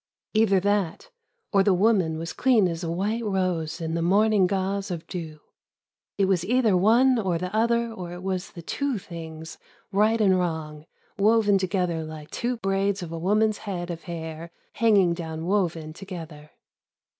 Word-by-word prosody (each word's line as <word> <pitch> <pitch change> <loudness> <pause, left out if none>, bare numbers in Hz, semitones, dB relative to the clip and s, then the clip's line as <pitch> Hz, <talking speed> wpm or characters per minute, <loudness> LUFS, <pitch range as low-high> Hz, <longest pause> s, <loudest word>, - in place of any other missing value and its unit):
Either 215 -3 +4
that... 205 - -1 0.4
or 195 - +5
the 195 -1 +3
woman 185 -5 +2
was 165 +1 -5
clean 240 -7 +3
as 165 0 -4
a 165 - -2
white 205 +7 -1
rose 185 -5 -1
in 160 -1 -3
the 165 - -1
morning 200 +2 +3
gauze 195 +1 -1
of 170 -3 -5
dew. 160 -4 -7 0.8
It 200 - +3
was 190 -3 +1
either 225 0 +2
one 235 +7 +4
or 185 -5 0
the 180 +4 -4
other 235 +1 +2
or 180 -5 -7
it 175 +1 -8
was 190 -1 -3
the 170 - -9
two 280 - -2
things, 160 -3 -9 0.3
right 215 +3 +3
and 190 -3 +4
wrong, 155 -3 -3 0.3
woven 205 -1 +4
together 180 -3 -1
Hke 155 -1 -9
two 245 +1 -2
braids 195 -1 0
of 165 - -7
a 165 - -4
woman's 210 +4 +2
head 180 -4 -4
of 170 -1 -8
hair 165 -1 -6 0.2
hanging 205 -6 +4
down 160 -1 -5
woven 170 -5 -1
together. 165 -5 -9
185 Hz, 170 wpm, -25 LUFS, 165-210 Hz, 0.8 s, or